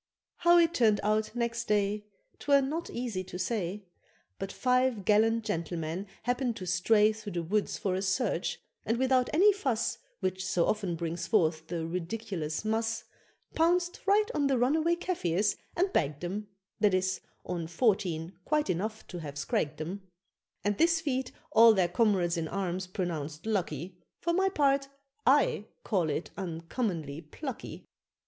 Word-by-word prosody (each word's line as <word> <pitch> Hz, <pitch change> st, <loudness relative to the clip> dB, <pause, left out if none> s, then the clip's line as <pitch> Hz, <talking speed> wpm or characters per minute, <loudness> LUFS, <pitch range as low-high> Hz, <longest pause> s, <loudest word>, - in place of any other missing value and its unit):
How 345 Hz, 0 st, +5 dB
it 335 Hz, -1 st, +4 dB
turned 220 Hz, -8 st, +4 dB
out 215 Hz, +2 st, +1 dB
next 235 Hz, -1 st, -1 dB
day 210 Hz, 0 st, +1 dB, 0.3 s
'Twere 280 Hz, -1 st, +4 dB
not 315 Hz, +6 st, -3 dB
easy 235 Hz, -6 st, -3 dB
to 180 Hz, 0 st, -7 dB
say; 195 Hz, 0 st, -2 dB, 0.6 s
But 195 Hz, 0 st, -4 dB
five 250 Hz, -5 st, +1 dB
gallant 225 Hz, +2 st, +3 dB
gentlemen 170 Hz, -1 st, -3 dB, 0.2 s
happened 245 Hz, -1 st, 0 dB
to 185 Hz, -, -6 dB
stray 210 Hz, +4 st, +4 dB
Through 215 Hz, -2 st, -8 dB
the 170 Hz, -1 st, -2 dB
woods 205 Hz, +5 st, 0 dB
for 190 Hz, -, -1 dB
a 185 Hz, -, -1 dB
search, 195 Hz, -1 st, 0 dB, 0.2 s
and 225 Hz, +2 st, 0 dB
without 260 Hz, 0 st, +2 dB
any 395 Hz, +7 st, +6 dB
fuss, 260 Hz, -, -1 dB, 0.2 s
Which 185 Hz, -1 st, -2 dB
so 175 Hz, -2 st, +1 dB
often 200 Hz, -5 st, 0 dB
brings 165 Hz, 0 st, -3 dB
forth 160 Hz, -6 st, +2 dB
the 165 Hz, -2 st, -3 dB
ridiculus 175 Hz, -1 st, -3 dB
mus, 225 Hz, +1 st, 0 dB, 0.5 s
Pounced 350 Hz, +2 st, +2 dB
right 415 Hz, +2 st, +5 dB
on 285 Hz, -2 st, +2 dB
the 270 Hz, -2 st, +2 dB
runaway 310 Hz, +7 st, +3 dB
Kafirs 205 Hz, -, 0 dB, 0.2 s
and 375 Hz, +2 st, +1 dB
bagged 145 Hz, 0 st, 0 dB
them 200 Hz, +4 st, -4 dB, 0.3 s
That 205 Hz, -3 st, +4 dB
is, 185 Hz, 0 st, 0 dB, 0.2 s
on 170 Hz, -2 st, -3 dB
fourteen 175 Hz, -3 st, 0 dB
(quite 300 Hz, -6 st, +1 dB
enough 215 Hz, +5 st, -3 dB
to 175 Hz, -, -7 dB
have 145 Hz, -3 st, -7 dB
scragged 145 Hz, +1 st, -1 dB
them); 175 Hz, +6 st, -5 dB, 0.6 s
And 205 Hz, 0 st, 0 dB
this 335 Hz, 0 st, +4 dB
feat 265 Hz, -5 st, -2 dB, 0.2 s
all 225 Hz, -1 st, +8 dB
their 185 Hz, -3 st, +3 dB
comrades 180 Hz, -3 st, +2 dB
in 165 Hz, -1 st, -1 dB
arms 185 Hz, 0 st, -2 dB
pronounced 160 Hz, -4 st, -4 dB
lucky 180 Hz, -4 st, -2 dB, 0.2 s
For 340 Hz, -, 0 dB
my 385 Hz, +2 st, +3 dB
part, 275 Hz, -5 st, +2 dB, 0.4 s
I 265 Hz, -6 st, +4 dB, 0.2 s
call 180 Hz, -6 st, +1 dB
it 150 Hz, +3 st, -3 dB
uncommonly 165 Hz, -, -3 dB
"plucky." 245 Hz, -, -7 dB
205 Hz, 155 wpm, -30 LUFS, 175-250 Hz, 0.6 s, all